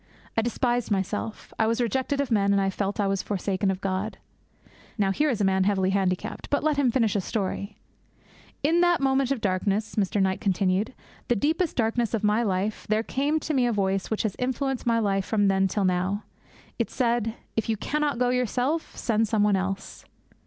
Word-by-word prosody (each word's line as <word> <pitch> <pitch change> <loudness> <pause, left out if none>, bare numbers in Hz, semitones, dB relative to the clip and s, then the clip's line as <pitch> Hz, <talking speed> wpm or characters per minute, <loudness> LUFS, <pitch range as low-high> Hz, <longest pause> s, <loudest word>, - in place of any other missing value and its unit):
I 225 - +3
despised 240 +1 0
myself. 205 +2 -3
I 220 - +3
was 230 +2 +1
rejected 260 +4 0
of 280 -3 -1
men, 200 -2 +3
and 200 - +3
I 195 0 +1
felt 200 +1 -2
that 210 - 0
I - - +1
was 195 -1 0
forsaken 195 0 -1
of 190 0 -2
God.' 195 +2 -2 0.8
Now 195 -2 +2
here 300 +10 +1
is 235 -6 -1
a - - +1
man 190 -1 +2
heavily 190 -2 +2
handicapped; 190 -2 -1
but 285 - +1
let 305 -2 +2
him 275 -3 +3
finish 230 -4 +2
his 200 - 0
story. 200 0 -3 0.9
'In 330 +4 +3
that 350 -1 +4
moment 270 -1 +2
of 275 -5 -1
darkness,' 200 +2 0
Mr. 205 0 +1
Knight 190 -1 +1
continued, 195 +4 +1 0.3
'the 240 - +2
deepest 315 - 0
darkness 230 -1 +1
of 215 - -3
my 210 +2 +3
life, 205 -1 -1
there 215 +1 +2
came 285 +6 0
to 310 - -2
me 255 -3 +3
a - - +1
voice 195 -2 0
which 220 - -1
has 215 -3 -1
influenced 260 0 -1
my 230 -1 +3
life 200 -3 +1
from 205 -1 +2
then 195 0 +3
till 195 +1 0
now. 185 +3 0 0.6
It - - 0
said. 235 -3 0 0.2
"If 225 +1 -1
you 220 - +1
cannot 295 +4 -1
go 250 0 +2
yourself, 250 +5 0
send 225 -1 +1
some 215 -1 +2
one 210 -1 +4
else." 195 +1 -4
215 Hz, 205 wpm, -26 LUFS, 195-250 Hz, 0.9 s, that